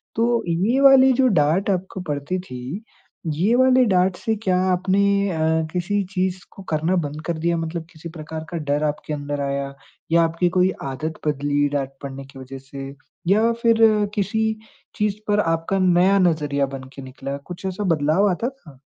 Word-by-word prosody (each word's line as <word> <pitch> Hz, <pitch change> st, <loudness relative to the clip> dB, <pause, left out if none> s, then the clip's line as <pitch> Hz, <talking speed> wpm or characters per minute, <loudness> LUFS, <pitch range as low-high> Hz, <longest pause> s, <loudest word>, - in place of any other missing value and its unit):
तो 235 Hz, +1 st, +1 dB
ये 190 Hz, +10 st, +1 dB
वाली 265 Hz, -1 st, +7 dB
जो 260 Hz, +1 st, +3 dB
डाँट 175 Hz, -1 st, +2 dB
आपको 190 Hz, 0 st, -2 dB
पड़ती 145 Hz, +5 st, -2 dB
थी, 140 Hz, -, -7 dB, 0.5 s
ये 195 Hz, +10 st, +2 dB
वाली 260 Hz, 0 st, +5 dB
डाँट 185 Hz, -3 st, +2 dB
से 220 Hz, +4 st, -1 dB
क्या 185 Hz, -1 st, +2 dB
आपने 185 Hz, +2 st, +1 dB, 0.3 s
अ, 160 Hz, -, -3 dB, 0.4 s
किसी 195 Hz, +3 st, 0 dB
चीज़ 185 Hz, 0 st, 0 dB
को 195 Hz, -, -12 dB
करना 160 Hz, +4 st, +1 dB
बंद 150 Hz, -3 st, -3 dB
कर 170 Hz, -2 st, -2 dB
दिया 170 Hz, +1 st, 0 dB
मतलब 165 Hz, 0 st, -4 dB
किसी 165 Hz, 0 st, -9 dB
प्रकार 160 Hz, -1 st, -7 dB
का 175 Hz, -, -4 dB
डर 145 Hz, -1 st, -1 dB
आपके 150 Hz, 0 st, -2 dB
अंदर 145 Hz, 0 st, -3 dB
आया 140 Hz, 0 st, -2 dB, 0.4 s
या 170 Hz, 0 st, +5 dB
आपकी 165 Hz, +2 st, +1 dB
कोई 185 Hz, +1 st, +4 dB, 0.2 s
आदत 155 Hz, +4 st, -5 dB
बदली 145 Hz, 0 st, +1 dB
डाँट 135 Hz, -2 st, -1 dB
पड़ने 135 Hz, 0 st, -7 dB
की 135 Hz, 0 st, -13 dB
वज़ह 130 Hz, +1 st, -8 dB
से 135 Hz, -1 st, -6 dB, 0.4 s
या 215 Hz, +5 st, +4 dB
फ़िर 230 Hz, -1 st, +4 dB, 0.4 s
किसी 205 Hz, +2 st, 0 dB, 0.5 s
चीज़ 210 Hz, -1 st, 0 dB
पर 205 Hz, 0 st, +2 dB
आपका 165 Hz, +1 st, 0 dB
नया 185 Hz, +1 st, +4 dB
नज़रिया 150 Hz, -6 st, +1 dB
बनके 130 Hz, +1 st, -10 dB
निकला 135 Hz, +1 st, -6 dB
कुछ 180 Hz, +1 st, -8 dB
ऐसा 190 Hz, +2 st, -3 dB
बदलाव 165 Hz, +3 st, +2 dB
आता 230 Hz, +7 st, -1 dB
था? 160 Hz, -, -17 dB
170 Hz, 175 wpm, -22 LUFS, 145-195 Hz, 0.5 s, वाली